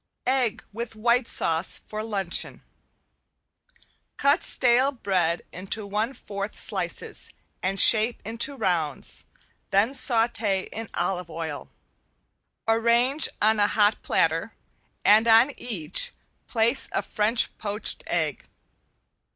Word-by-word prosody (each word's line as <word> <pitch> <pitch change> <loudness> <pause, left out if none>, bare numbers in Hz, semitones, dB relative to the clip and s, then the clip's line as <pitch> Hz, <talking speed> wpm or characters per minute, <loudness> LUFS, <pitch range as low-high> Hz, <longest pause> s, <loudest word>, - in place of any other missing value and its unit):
~EGG 255 -4 0
WITH 230 +1 -5
WHITE 235 +2 +2
SAUCE 165 +2 +1
FOR 215 0 -5
LUNCHEON~ 210 -3 -3 1.5
Cut 285 +5 +3
stale 255 +2 +4
bread 185 -9 -1
into 195 +4 -5
one 210 +5 -2
fourth 200 -2 -6
slices - - -1 0.3
and 195 +1 -1
shape 225 +1 +4
into 230 +6 0
rounds, 175 - -2 0.4
then 210 +7 +2
saute 225 -6 +1
in 225 0 -6
olive 180 -2 -2
oil. 160 -2 -6 1.0
Arrange 235 +6 +3
on 215 0 +3
a 205 - +4
hot 210 0 +2
platter 165 +6 0 0.5
and 215 +3 +5
on 230 +5 +6
each 185 -9 0 0.3
place 230 +2 +1
a - - -1
French 220 +2 +2
poached 210 0 -3
egg. - - -2
220 Hz, 110 wpm, -25 LUFS, 195-235 Hz, 1.5 s, on